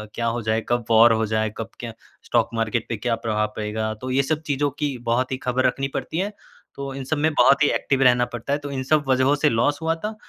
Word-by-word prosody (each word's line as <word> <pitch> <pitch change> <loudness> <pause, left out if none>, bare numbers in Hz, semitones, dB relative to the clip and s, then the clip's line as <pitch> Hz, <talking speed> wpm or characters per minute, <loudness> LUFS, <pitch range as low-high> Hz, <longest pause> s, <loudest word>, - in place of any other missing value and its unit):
क्या 115 0 -1
हो 115 +1 -1
जाए? 110 +1 0
कब 120 -2 0
वॉर 115 +1 +7
हो 110 0 +1
जाए? 110 0 0
कब 115 0 -5
क्या 115 -2 -6 0.3
स्टॉक 115 -1 +1
मार्केट 115 0 -1
पे 115 - -2
क्या 115 +2 -1
प्रभाव 105 -1 0
पड़ेगा? 110 +1 -3
तो 130 0 -4
ये 135 +1 +2
सब 155 +3 -1
चीज़ों 145 +1 +1
की 145 -4 -1
बहुत 130 +2 +1
ही 130 - -1
खबर 130 +1 +1
रखनी 135 0 -1
पड़ती 160 - -4
है। 200 +3 -2 0.4
तो 140 -1 -5
इन 135 0 -6
सब 155 +3 -2
में 155 +2 +2
बहुत 145 0 +5
ही 145 - +4
एक्टिव 135 -1 0
रहना 125 -1 +4
पड़ता 120 +4 -3
है, 145 - 0
तो 145 -1 -7
इन 130 -1 -3
सब 150 +2 +2
वजहों 130 +2 +3
से 150 +1 +2
लॉस 145 +7 +1
हुआ 160 0 0
था। 215 - -4
130 Hz, 255 wpm, -23 LUFS, 115-140 Hz, 0.4 s, वॉर